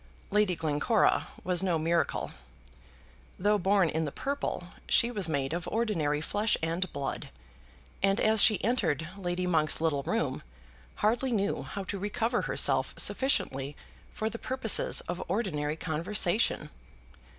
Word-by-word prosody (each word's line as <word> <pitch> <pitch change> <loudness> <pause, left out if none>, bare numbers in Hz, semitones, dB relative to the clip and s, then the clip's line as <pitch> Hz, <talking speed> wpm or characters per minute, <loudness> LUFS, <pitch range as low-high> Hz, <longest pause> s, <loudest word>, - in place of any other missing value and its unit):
Lady 210 -3 +2
Glencora 160 +8 +1 0.2
was 180 0 +3
no 180 -3 +1
miracle. 165 +2 0 1.1
Though 205 +2 +2
born 195 0 +3
in 160 +1 -1
the 150 - -3
purple, 280 - -3 0.3
she 235 - +3
was 200 -7 0
made 140 -1 -1
of 170 0 -3
ordinary 165 -10 0
flesh 210 +7 +1
and 170 +2 -1
blood, 140 -1 -4 0.7
and 195 +1 +2
as 220 -1 +4
she 215 - +5
entered 165 - 0
Lady 180 -2 -2
Monk's 155 -4 +2
little 155 -3 +1
room, - - -1 0.6
hardly 245 +4 +1
knew 205 -3 0
how 200 - -6
to 195 +1 -5
recover 225 +4 -1
herself - - 0
sufficiently 140 - 0 0.3
for 220 - -3
the 230 +1 -5
purposes 255 -4 +3
of 175 0 -5
ordinary 160 -7 -1
conversation. 175 +5 +1
185 Hz, 135 wpm, -29 LUFS, 160-215 Hz, 1.1 s, she